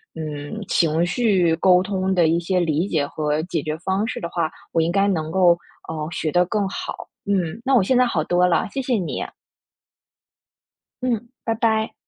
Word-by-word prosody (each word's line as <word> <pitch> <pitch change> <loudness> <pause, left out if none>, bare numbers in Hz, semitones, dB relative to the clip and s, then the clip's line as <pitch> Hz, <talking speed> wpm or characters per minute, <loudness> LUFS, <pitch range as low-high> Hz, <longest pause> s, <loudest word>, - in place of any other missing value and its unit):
嗯， 155 +6 -5
情 165 0 +2
绪 180 -4 +2
沟 180 +1 +5
通 190 -1 -1
的 170 -3 +4
一 165 +2 +2
些 180 +2 0
理 165 +2 +1
解 155 -6 0
和 150 +1 -1
解 170 -3 -2
决 155 0 -2
方 190 +5 -1
式 - - -4
的 170 - -4
话， 170 -3 -1 0.2
我 - - +1
应 165 +1 +1
该 195 +2 +2
能 160 -5 -1
够， 175 -1 +4 0.3
呃， 155 -1 -4
学 155 -1 -2
得 175 +2 +4
更 205 +1 -1
好。 - - -6 0.2
嗯， 195 -1 -1
那 270 0 +3
我 240 - +6
现 255 +7 +2
在 250 - +5
好 170 -10 0
多 180 +2 +2
了， 175 - +1
谢 275 - -3
谢 255 -1 -1
你。 185 -6 -2 1.8
嗯， 240 -2 -1 0.2
拜 225 - 0
拜。 220 -1 +1
180 Hz, 205 characters per minute, -22 LUFS, 160-205 Hz, 1.8 s, 我